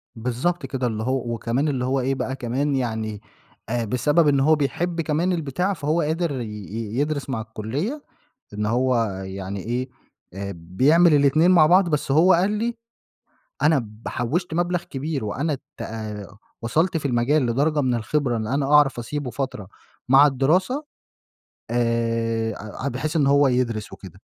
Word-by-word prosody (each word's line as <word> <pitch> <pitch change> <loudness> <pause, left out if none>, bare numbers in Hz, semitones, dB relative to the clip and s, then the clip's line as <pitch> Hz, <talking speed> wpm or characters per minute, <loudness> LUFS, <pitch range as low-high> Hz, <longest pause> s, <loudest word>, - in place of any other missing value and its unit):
بالضبط 130 +8 -2
كده، 130 -1 -2
اللي 110 -1 -3
هو 125 -2 -1
وكمان 120 +6 -1
اللي 130 -4 -1
هو 135 +1 +1
إيه 135 +1 0
بقى 130 0 -3
كمان 135 +3 -1
يعني 110 -4 -3 0.5
آآ، 120 0 -1
بسبب 145 +8 +2
إن 140 -2 +3
هو 155 +3 +4
بيحب 165 +4 -1
كمان 165 +4 0
البتاع 175 +4 -1
فهو 155 +1 0
قادر 155 -3 -1
ي 115 - -3 0.5
يدرس 145 -1 -1
مع 115 -4 -2
الكلية 130 - -4 0.5
إن 105 0 -2
هو 125 +3 +2 0.3
يعني 95 +1 -5
إيه 125 +3 -2 0.5
آآ 100 0 -5
بيعمل 140 - +3
الإتنين 145 +4 +4
مع 170 -4 +6
بعض، 180 +2 +5
بس 150 -1 -1
هو 175 +5 +6
قال 180 +4 +3
لي: 225 +3 -1 0.9
"أنا 155 -3 +4
ب 110 -1 -10
حوشت 160 +9 -2
مبلغ 175 +1 0
كبير 140 -2 -4
وأنا 140 +9 -1 0.2
ت - - -4 0.8
وصلت 160 +10 +1
في 145 -3 -2
المجال 125 +3 +2
لدرجة 145 +5 +1
من 130 -2 +1
الخبرة، 120 +1 0
إن 110 - -3
أنا 135 +4 0
أعرف 145 -4 +5
أسيبه 125 +2 -4
فترة 115 -5 -4 0.4
مع 135 +2 +7
الدراسة." 180 - +1 0.9
آآ، 115 0 -1
بحيث 140 +5 -3
إن 145 -3 +3
هو 140 0 +5
يدْرس 120 -4 -1
وكده. - - -12
135 Hz, 155 wpm, -23 LUFS, 115-155 Hz, 0.9 s, مع